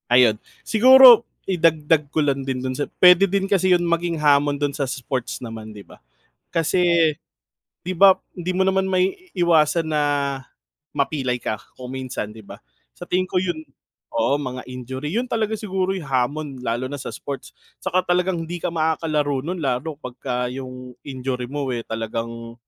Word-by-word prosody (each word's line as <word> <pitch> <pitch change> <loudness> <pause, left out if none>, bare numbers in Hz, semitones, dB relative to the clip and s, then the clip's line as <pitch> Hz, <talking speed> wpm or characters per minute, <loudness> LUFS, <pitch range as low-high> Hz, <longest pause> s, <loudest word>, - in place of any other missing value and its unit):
Ayun, 120 -3 +5 0.3
siguro 250 +1 +8 0.2
idagdag 160 -4 +2
ko 155 +1 0
lang 140 -1 0
din 130 -1 -2
dun 130 0 -2
sa 145 - -2
puwede 180 +2 +7
din 195 +1 0
kasi 185 -2 +3
yung 175 -1 +2
maging 170 0 0
hamon 145 -1 +3
dun 145 0 -1
sa 140 -1 -2
sports 130 -1 -4
naman, 110 -2 -7
'di 100 - -10
ba? - - -17 0.5
Kasi 170 -1 +2 0.7
'di 185 - -3
ba, 190 +1 +7 0.2
hindi 180 0 -3
mo 190 +1 +2
naman 190 0 +1
maiiwasan 175 - +1
na 155 -1 0 0.9
mapilay 135 -3 -1
ka 110 - -2 0.2
kung 125 0 -8
minsan, 130 -5 -5
'di 110 0 -13
ba? - - -11 0.3
Sa - - -16
tingin 185 +1 +1
ko, 180 0 0
yun, 175 -3 -2 0.6
oo, 115 +5 +2
mga 130 -3 -5
injury, 130 +3 -6
yun 235 +8 -1
talaga 220 -2 -1
siguro 190 -3 -2
yung 190 -5 -4
hamon 135 +4 -1
lalo 120 +1 -2
na 145 +2 -6
sa - - -5
sports 135 +4 -7 0.3
saka 185 +1 0
talagang 175 -1 0
hindi 175 +1 -6
ka - - -1
makakalaro 155 -4 0
nun 180 +5 -4
lalo 140 +1 -2
pagka 125 -2 -4
yung 130 -1 -8
injury 130 -2 -4
mo 145 -1 -3
eh 120 - -3
talagang, 115 +1 -5
150 Hz, 165 wpm, -22 LUFS, 130-180 Hz, 0.9 s, siguro